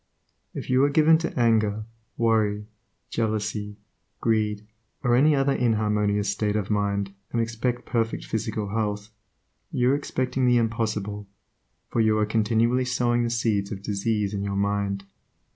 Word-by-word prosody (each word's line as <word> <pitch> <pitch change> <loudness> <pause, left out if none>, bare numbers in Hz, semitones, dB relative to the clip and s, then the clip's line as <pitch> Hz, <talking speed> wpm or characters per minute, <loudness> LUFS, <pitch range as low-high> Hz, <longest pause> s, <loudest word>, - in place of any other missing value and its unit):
If - - -5
you 130 +1 +3
are 145 - +4
given 160 +2 +5
to 165 -5 -3
anger, 110 -2 +2 0.3
worry, 110 -3 +1 0.5
jealousy, 105 -2 -2 0.4
greed, 105 -2 0 0.4
or 120 -2 +3
any 150 +4 +5
other 135 0 +2
inharmonious 105 -4 +1
state 105 +1 0
of 105 -1 -1
mind, 100 -1 0 0.2
and 120 - 0
expect 120 +2 -2
perfect 115 -2 -1
physical 110 -2 -3
health, 105 0 -2 0.6
you 125 +1 +2
are - - +3
expecting 130 -2 -1
the 125 0 +5
impossible, 110 -3 -1 0.6
for 115 - +2
you 110 -1 +3
are 105 - +2
continually 115 +3 +2
sowing 120 -1 +1
the 120 - 0
seeds 110 -4 0
of 100 -2 -6
disease 105 0 -1
in 100 - -2
your 100 0 -2
mind. 100 0 -1
110 Hz, 145 wpm, -25 LUFS, 105-120 Hz, 0.6 s, given